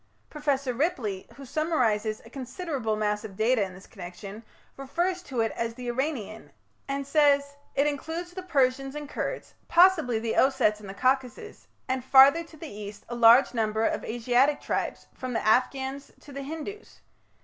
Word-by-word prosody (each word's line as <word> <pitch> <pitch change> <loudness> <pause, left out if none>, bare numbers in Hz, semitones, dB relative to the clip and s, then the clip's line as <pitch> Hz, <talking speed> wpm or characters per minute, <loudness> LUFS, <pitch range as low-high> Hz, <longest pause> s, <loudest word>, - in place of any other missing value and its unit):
Professor 280 -4 -1
Ripley, 235 - -2
who 275 - -10
summarizes 240 -8 0
a - - -13
considerable 260 - -3
mass 210 0 -1
of 205 -3 -9
data 230 +1 +2
in 190 -2 -3
this 190 - -13
connection, 195 +3 -9 0.3
refers 345 +7 -2
to 260 -9 -3
it 225 - 0
as 230 0 -3
the 250 0 -7
"Iranian", 240 -5 -4 0.4
and 275 0 -3
says: 285 -1 +3 0.2
"It 280 - +3
includes 320 +4 -3
the 370 - -6
Persians 270 -5 0
and 295 -1 -6
Kurds, - - -5
possibly 340 -9 +5
the 225 0 -2
Ossetes 215 -6 +3
in 205 - -10
the 195 - -8
Caucasus, 260 - -1 0.2
and 260 -1 -1
farther 275 +5 +7
to 325 -1 -16
the 320 - -8
east 205 -3 -9
a 240 - -4
large 235 +3 +6
number 220 -1 0
of - - -1
Asiatic 245 +5 +2
tribes, - - -3
from 255 -1 -5
the 225 - -2
Afghans 265 +4 +1
to 290 - -14
the 275 0 -6
Hindus. 320 +9 -8
260 Hz, 170 wpm, -27 LUFS, 225-290 Hz, 0.4 s, farther